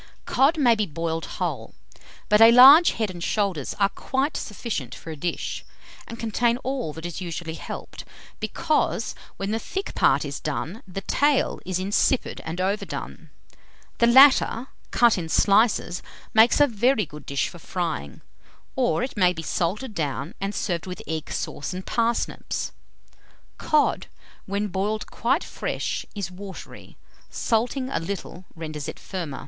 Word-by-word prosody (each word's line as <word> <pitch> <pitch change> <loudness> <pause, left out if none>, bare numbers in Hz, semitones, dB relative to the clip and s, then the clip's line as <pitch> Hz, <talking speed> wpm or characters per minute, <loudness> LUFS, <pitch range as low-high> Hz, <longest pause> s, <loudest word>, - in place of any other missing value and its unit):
Cod 285 +5 +3
may 250 -6 +5
be 215 -2 0
boiled 165 +1 -3
whole; - - -3 0.5
but 210 +1 +4
a 225 +1 +10
large 275 +8 +9
head 220 -4 -2
and 175 -2 -7
shoulders 195 - -1
are 200 -1 +4
quite 270 +8 -2
sufficient 195 - -4
for 165 - -9
a - - -6
dish, 170 +4 -3 0.4
and 230 - -7
contain 230 +1 +1
all 260 - -2
that 160 +2 -8
is 175 +2 -5
usually 170 -2 -5
helped, - - -8 0.4
because, 310 -2 0 0.2
when 195 +1 -3
the 225 - 0
thick 390 - -5
part - - +3
is - - -5
done, 200 +8 -4
the 190 +1 -5
tail 285 +7 +1
is 185 -1 0
insipid 200 +7 0
and 165 +2 -5
overdone. 195 +3 -3 0.7
The 235 - +5
latter, 260 -1 +6 0.2
cut 235 -5 +4
in 165 -2 -5
slices, 200 -2 +3 0.3
makes 220 +2 +6
a 290 - +7
very 235 -2 +2
good 150 -1 -12
dish 140 -1 0
for 175 - -11
frying; 165 - -4 0.5
or 250 -1 +1
it 260 - -4
may 180 -3 +4
be 165 -2 -6
salted 210 +10 -2
down 145 - -3
and 200 +1 -2
served 175 -2 -2
with 180 - -7
egg 160 -1 -4
sauce 145 - -4
and 185 - -6
parsnips. 230 0 -1 0.9
Cod, 305 -1 +2 0.4
when 200 +2 -1
boiled 205 +3 -2
quite 265 +9 +1
fresh, - - -3
is 195 -3 -4
watery; 190 +1 -10 0.3
salting 250 +3 -1
a - - 0
little, 180 +1 -6
renders 155 -3 -6
it - - -6
firmer. 170 -8 -5
200 Hz, 155 wpm, -24 LUFS, 170-235 Hz, 0.9 s, a